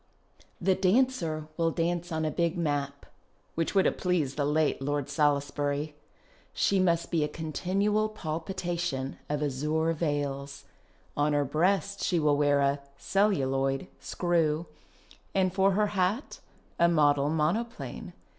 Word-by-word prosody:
The 190 +2 +3
dancer 185 -6 +1
\\all 165 0 +3
dance 175 +1 -1
on 160 -1 -1
a 155 - 0
big 170 +2 0
map 145 -3 -2 0.5
(which 165 +4 -2
would 195 - +4
have - - +1
pleased 170 -7 0
the 145 - 0
late 150 -1 +1
Lord 145 0 -2
Salisbury). 145 0 0 0.6
She 195 - +2
must 170 -2 +1
be 165 -3 +2
a - - +1
continual 190 +7 0
palpitation 170 -6 -3
of 150 0 -1
azure 150 +4 0
veils. 140 -3 -3 0.5
On 145 +1 +1
her 145 -1 +2
breast 195 +7 0
she 180 - +1
will 150 -2 +3
wear 145 -1 +3
a 140 +1 +2 0.2
(celluloid) 135 -9 +1
screw, 165 -2 0 0.7
and 185 -2 +2
for 195 0 +3
her 210 +2 +2
hat 195 +7 -1 0.4
a 170 - +6
model 145 -3 +3
monoplane. 175 +10 -2
160 Hz, 135 wpm, -28 LUFS, 145-185 Hz, 0.7 s, a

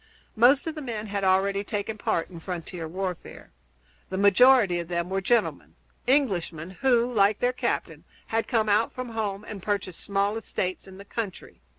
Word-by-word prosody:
Most 250 +5 +5
of 320 - -3
the 305 - -7
men 225 -5 -4
had 200 -1 -3
already 195 +1 +2
taken 205 +1 -3
part 170 -5 -1
in 170 - -9
frontier 170 -1 -6
warfare. 185 +1 -6 0.6
The 190 - -3
majority 200 -1 +5
of 170 - -5
them 170 +1 -2
were 195 0 0
gentlemen 230 +3 0 0.3
Englishmen 185 - +1
who, 245 +3 +2
like 205 -1 +4
their 245 +1 +1
captain, - - -2 0.2
had 225 0 -1
come 225 -4 +1
out 210 +2 +3
from 255 -1 -6
home 210 -3 -3
and 205 -3 -7
purchased 200 -3 -2
small 200 +1 0
estates 185 -4 -3
in 190 0 -12
the 200 - -11
country. 205 -4 -6
200 Hz, 175 wpm, -26 LUFS, 185-230 Hz, 0.6 s, Most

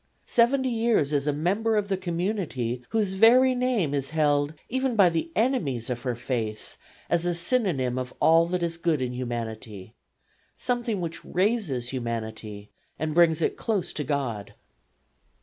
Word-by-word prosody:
Seventy 260 +2 +3
years 225 -11 +1
a - - +3
member 195 +10 0
of 210 -1 0
the 195 - 0
community 175 - -2
whose 210 -4 0
very 245 +6 +6
name 245 - 0
is 140 -1 -1
held 150 -1 +1
even 260 0 -1
by 195 -4 +6
the 165 -1 -2
enemies 165 - 0
of 120 -1 -3
her 125 -2 -2
faith 115 -3 -4 0.3
as 170 -1 +1
a 175 - 0
synonym 170 - +1
of 125 -1 -5
all 165 +1 +5
that 180 0 -2
is 165 0 -2
good 165 -3 0
in 125 -1 -2
humanity 115 -5 -6 0.6
something 240 -5 -1
which 165 -1 -5
raises 180 - 0
humanity 110 -4 -5 0.3
and 155 +1 -2
brings 165 -1 +4
it - - 0
close 210 -6 -2
to 150 - -2
God. 125 -9 -3
165 Hz, 150 wpm, -26 LUFS, 125-210 Hz, 0.6 s, very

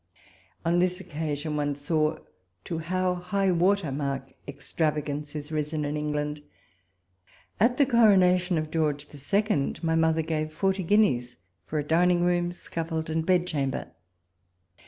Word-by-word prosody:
On 170 +1 +3
this 180 +1 +1
occasion 155 -3 -4
one 145 -1 -1
saw 155 +2 0 0.5
to 165 - -4
how 185 +2 0
high 185 +2 0
water 180 -2 +2
mark 135 -1 -3
extravagance 150 0 -3
is 150 +1 -5
risen 150 0 -2
in 145 +1 -2
England. 150 0 -2 1.2
At 240 +5 +3
the 285 - +5
Coronation 185 -7 +4
of 155 0 -3
George 150 -3 -1 0.2
II. 205 -8 +1
ray 160 0 +1
mother 160 0 +2
gave 155 -1 -2
forty 190 +3 0
guineas 165 - +2 0.3
for 155 - -3
a 150 - 0
dining 175 +3 +3
room, 175 0 +1
scaffold, 160 -2 -4
and 160 0 0
bed 180 0 +2
chamber. 140 -6 -2
160 Hz, 135 wpm, -27 LUFS, 150-180 Hz, 1.2 s, the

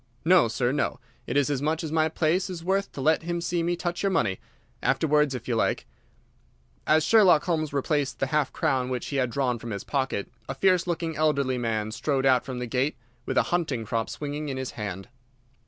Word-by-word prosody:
No, 180 -6 +6
sir, 120 +2 0
no; 140 +1 -1 0.3
it 125 - 0
is 145 0 +2
as 135 -2 -1
much 155 +3 0
as 155 - -4
my 160 0 +2
place 170 +4 +1
is 175 -3 -6
worth 195 +2 0
to 140 - -5
let 155 +3 +3
him 170 +1 -2
see 170 0 -1
me 175 +1 0
touch 175 0 -3
your 200 - +2
money. 110 - 0 0.4
Afterwards, 150 -3 +2
if 120 - -7
you 120 - 0
like." 115 - 0 1.0
As 155 0 +4
Sherlock 190 -8 +5
Holmes 155 -4 -1
replaced 145 0 0
the - - 0
half 150 -2 +2
crown 130 -5 0
which 125 -1 -3
he 140 - -2
had 130 -2 +1
drawn 125 -1 0
from 115 - -7
his 100 -2 -4
pocket, 135 -7 -2 0.2
a 135 - -3
fierce 180 +3 +3
looking 165 -2 -2
elderly 140 -4 +1
man 110 -2 -1
strode 135 +3 -1
out 130 -2 +4
from 130 -2 -5
the 125 - -3
gate 130 +5 -1 0.3
with - - -1
a - - +5
hunting 145 -10 0
crop 115 0 -2
swinging 150 0 -4
in 135 - -3
his 130 -1 -4
hand. 100 -3 -6
145 Hz, 215 wpm, -26 LUFS, 125-165 Hz, 1.0 s, No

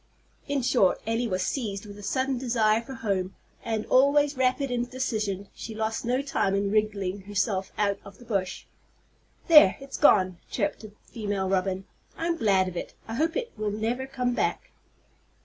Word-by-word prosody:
'" - - -35
In 285 -2 0
short, 235 -6 +3
Elly 225 +2 0
was 185 -3 -1
seized 210 -6 -3
with 205 -1 -9
a 205 - -11
sudden 260 +4 -1
desire 230 -3 +2
for 265 +3 -9
home, 195 -5 -2 0.3
and, 220 -2 -2
always 285 +2 +4
rapid 260 +1 +1
in 245 -1 0
decision, 215 -6 -2
she 220 - -8
lost 220 +1 -2
no 250 +3 +1
time 195 -8 0
in 200 0 0
wriggling 205 -3 0
herself 205 -1 -1
out 200 -1 +1
of 200 -1 -13
the 245 - -15
bush. 195 -5 -2 0.8
"There, 300 - +8
it's 275 0 -7
gone!" 185 - +4
chirped 200 -4 -1
the 215 -2 -10
female 205 -4 -3
robin. 190 0 0 0.3
"I'm 335 +1 0
glad 195 - +3
of 180 - -6
it. - - -5
I 225 - -5
hope 320 - 0
it 480 -1 -3
will 215 -1 -2
never 230 +5 -2
come 250 -2 -1
back." - - -1
220 Hz, 180 wpm, -27 LUFS, 200-255 Hz, 0.8 s, There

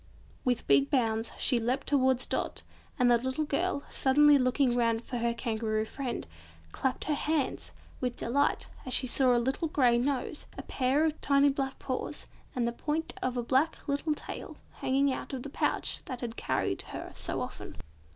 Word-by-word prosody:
With 250 -4 0
big 140 0 +4
bounds 225 -3 +1
she 250 -3 +3
leapt 245 +4 -1
towards 260 -2 +2
Dot, - - -2 0.3
and 250 -3 +4
the 235 - +5
little 260 +5 -1
girl, 305 +1 -1
suddenly 290 +2 +5
looking 255 0 +2
round 230 -1 +1
for 245 - -3
her 235 0 +1
Kangaroo 220 -2 -1
friend, 260 +1 -4 0.5
clapped 260 - -1
her 305 - 0
hands 300 -2 -1 0.3
with 250 -1 -2
delight 280 +5 +1 0.2
as 255 - +3
she - - +4
saw 255 0 +3
a - - +4
little 265 +7 0
grey 250 -6 +3
nose, 275 +3 -2
a - - -5
pair 275 +4 +1
of 315 -1 -2
tiny 280 0 +4
black 270 -1 -2
paws, 255 -1 -4 0.3
and 240 -2 +1
the - - 0
point 305 +6 -2
of 255 -1 -1
a 240 - 0
black 270 +8 +1
little 290 +2 0
tail, - - -7 0.2
hanging 275 +1 +2
out - - -6
of 255 -2 -4
the 285 - -7
pouch - - 0
that 255 -2 -6
had 235 -2 -4
carried - - -1
her - - -8
so - - -3
often. - - -6
260 Hz, 180 wpm, -30 LUFS, 240-280 Hz, 0.5 s, the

